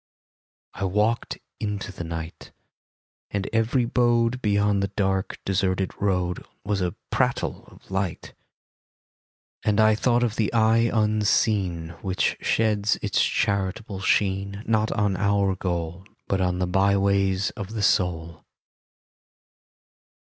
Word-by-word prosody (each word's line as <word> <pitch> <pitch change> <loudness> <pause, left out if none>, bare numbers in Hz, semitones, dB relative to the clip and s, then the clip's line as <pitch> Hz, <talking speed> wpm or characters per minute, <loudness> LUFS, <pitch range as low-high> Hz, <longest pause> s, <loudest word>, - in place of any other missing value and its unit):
I 100 - -3
walked 105 +5 0 0.2
into 105 -2 -3
the 95 - -7
night, 80 -1 -7 0.8
And 100 -1 -2
every 115 +3 +2
abode 120 0 +2
Beyond 105 -2 +2
the 100 - 0
dark, 95 -1 -1
deserted 95 -1 0
road 90 -3 0 0.2
Was 100 -1 0
a 90 -1 -1 0.2
prattle - - 0
of - - -18
light. 95 -3 -3 1.3
And 105 0 +2
I 110 0 +6
thought 120 +2 +2
of 115 -2 -1
the 110 - +1
Eye 115 +1 +4
Unseen 105 -5 +1
Which 95 -1 0
sheds 105 -2 +1
its - - +2
charitable 100 +1 -1
sheen, 100 +1 0
Not 110 -1 +1
on 100 -2 +1
our 100 -1 +2
goal. 85 0 -4 0.2
But 95 -1 0
on 90 -1 +1
the 90 - 0
by 95 +2 +2
ways 100 -1 +1
of 105 0 -7
the 105 - -1
Soul. 85 -4 0
100 Hz, 125 wpm, -25 LUFS, 95-110 Hz, 1.3 s, I